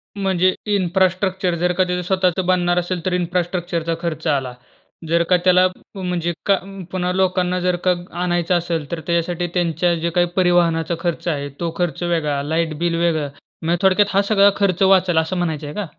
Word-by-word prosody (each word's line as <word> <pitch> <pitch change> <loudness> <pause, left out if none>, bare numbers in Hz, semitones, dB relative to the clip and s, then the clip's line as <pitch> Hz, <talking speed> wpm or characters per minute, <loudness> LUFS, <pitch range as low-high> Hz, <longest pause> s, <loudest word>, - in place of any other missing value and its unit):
म्हणजे 185 -2 +1 0.2
इन्फ्रास्ट्रक्चर 185 0 +1
जर 180 0 +1
का 185 - +2
त्याचं 180 0 -2
स्वतःचं 185 -1 +1
बनणार 175 -1 +2
असेल, 175 -1 -3
तर 185 - 0
इन्फ्रास्ट्रक्चरचा 175 -1 -1
खर्च 165 -1 -3
आला. 135 -4 0 0.6
जर 170 0 +3
का 180 - +5
त्याला 185 0 +5 0.3
म्हणजे 180 -2 -2
का 200 -1 +4
उम्म, 195 0 -9
पुन्हा 180 -1 -1
लोकांना 185 -1 +1
जर 180 0 +1
का 180 - +5 0.3
आणायचं 175 0 +1
असेल 165 -3 -3
तर 170 - -3
त्याच्यासाठी 170 +1 0
त्यांच्या 175 0 +1
जे 170 +1 -2
काही 175 +1 +2
परिवहनाचा 170 -2 +2
खर्च 170 0 -3
आहे, 145 -4 -2
तो 170 -1 -2
खर्च 175 -2 -2
वेगळा, 155 -5 0
लाईट 160 +1 -1
बिल 170 -1 0
वेगळं. 160 -4 0 0.3
म्हणजे 170 +2 0
थोडक्यात 190 +2 +5
हा 200 - +5
सगळा 200 -1 +6
खर्च 195 -3 0
वाचेल, 185 -3 +4
असं 160 +3 +1
म्हणायचंय 155 -4 -3
का? 210 - -3
175 Hz, 175 wpm, -20 LUFS, 170-185 Hz, 0.6 s, सगळा